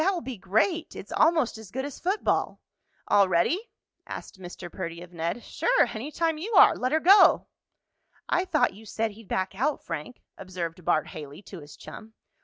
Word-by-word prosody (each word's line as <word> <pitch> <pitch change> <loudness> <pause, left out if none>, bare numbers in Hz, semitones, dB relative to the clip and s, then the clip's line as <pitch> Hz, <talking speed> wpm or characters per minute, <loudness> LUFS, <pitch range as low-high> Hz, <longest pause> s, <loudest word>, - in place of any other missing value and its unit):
"That 385 +2 +2
will 345 - -3
be 260 -4 -6
great! 220 - 0
It's - - -9
almost 315 -9 +2
as 220 -4 -11
good 265 +6 -4
as 285 - -8
football." 385 +4 0 0.5
"All 200 -2 +4
ready?" 335 - +1 0.4
asked 195 - -8
Mr. 175 -1 -9
Perdy 170 -2 -6
of 180 0 -15
Ned. 170 +7 -3
"Sure. - - +2
Any 230 +7 -5
time 325 -1 0
you 430 +8 -5
are. - - +8
Let 255 - -1
her 315 - +3
go!" 385 +6 +6 0.8
"I 365 - +1
thought 310 -4 +2
you 220 +2 -14
said 220 +2 -2
he'd 215 0 -15
back 190 +1 -2
out, 260 +9 -1
Frank," 165 +7 -7 0.2
observed 180 -2 -6
Bart 155 -1 +1
Haley 150 +4 -9
to 190 - -10
his 145 -1 -13
chum. 220 0 -11
220 Hz, 190 wpm, -27 LUFS, -, 0.8 s, are